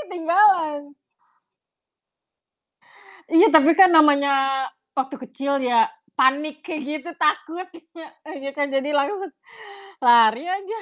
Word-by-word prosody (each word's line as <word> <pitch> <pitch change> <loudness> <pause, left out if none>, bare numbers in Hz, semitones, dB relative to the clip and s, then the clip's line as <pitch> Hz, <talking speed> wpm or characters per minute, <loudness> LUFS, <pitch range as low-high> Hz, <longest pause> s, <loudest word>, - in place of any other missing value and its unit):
ketinggalan. 335 -4 0 2.4
Iya 335 +5 +4
tapi 315 +1 +4
kan 380 -1 +6
namanya 280 -3 +2 0.3
waktu 265 +1 -3
kecil 275 +2 -4
ya, 245 - +1 0.2
panik 290 +3 0
kayak 320 -4 -6
gitu 310 +3 -6
takutnya, 325 +1 -5 0.3
iya 275 0 -7
kan 285 -1 -3
jadi 275 +1 -2
langsung 385 +8 -2 0.7
lari 235 0 +4
aja. 390 +3 -5
300 Hz, 100 wpm, -21 LUFS, 275-335 Hz, 2.4 s, kan